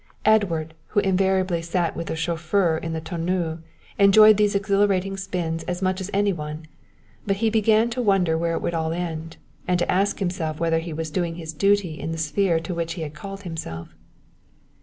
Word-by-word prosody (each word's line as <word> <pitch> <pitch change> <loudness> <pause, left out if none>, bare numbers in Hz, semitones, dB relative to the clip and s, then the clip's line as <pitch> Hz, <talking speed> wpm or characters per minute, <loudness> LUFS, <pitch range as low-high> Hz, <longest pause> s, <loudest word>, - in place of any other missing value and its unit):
Edward, 175 -8 +2
who 210 - +1
invariably 190 -2 +1
sat 170 0 -1
with 165 - -5
the - - -2
chauffeur 165 +2 +1
in 165 0 -5
the 160 - -3
tonneau, 170 0 -2 0.4
enjoyed 215 +2 +8
these 205 0 +2
exhilarating 195 -1 +1
spins 180 -4 -3
as 180 +1 -3
much 185 +1 0
as 190 - -5
any 200 0 +2
one, 155 -1 -6 0.6
but 195 - +2
he 220 +2 +1
began 220 +1 +3
to 250 +2 -2
wonder 195 -7 +2
where 165 +1 0
it - - -3
would 170 - -1
all 160 -1 -1
end, 165 -2 -5 0.3
and 180 -1 +2
to 175 - 0
ask 195 +2 +1
himself 175 -5 -2
whether 165 -1 +2
he 165 +1 -6
was 160 0 -4
doing 170 -1 -1
his 160 -1 -6
duty 195 -1 +1
in 160 - -4
the 165 - -4
sphere 165 +2 +1
to 165 +2 -5
which 170 -1 -2
he 165 - -5
had 150 -1 -6
called 195 +5 -8
himself. 160 - -6
175 Hz, 195 wpm, -24 LUFS, 165-195 Hz, 0.6 s, enjoyed